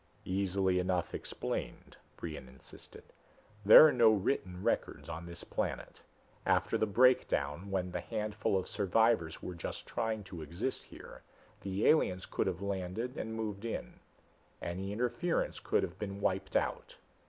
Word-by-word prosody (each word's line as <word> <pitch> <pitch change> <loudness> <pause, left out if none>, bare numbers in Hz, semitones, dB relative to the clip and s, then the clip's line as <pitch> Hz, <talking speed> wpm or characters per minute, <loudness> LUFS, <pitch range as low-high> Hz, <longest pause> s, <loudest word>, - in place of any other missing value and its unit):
"Easily 95 -1 +1
enough 90 -1 -1
explained," - - -5 0.2
Brion 75 -6 -6
insisted. 65 0 -13 0.6
"There 110 +9 +11
are 155 - +5
no 120 -3 +6
written 100 -3 0
records - - -1
on 80 +2 -6
this 85 0 -7
planet. - - -4 0.4
After - - +2
the 110 - +2
Breakdown, 100 - +2
when 90 -2 -1
the - - -3
handful 105 -3 -1
of 95 - -3
survivors 105 -4 +1
were 90 - -4
just 85 - -6
trying 110 -2 -2
to 90 -3 -8
exist 85 - -4
here, - - -12 0.4
the 100 +1 -2
aliens 95 -12 +3
could - - -1
have 95 0 -2
landed 100 +5 -3
and 110 0 -4
moved 105 -2 -4
in. 115 - -5 0.6
Any 95 +3 -4
interference 120 +10 -1
could - - +1
have 90 +2 -5
been 100 -2 -4
wiped 95 -1 -1
out. - - -1
100 Hz, 145 wpm, -33 LUFS, 90-110 Hz, 0.6 s, There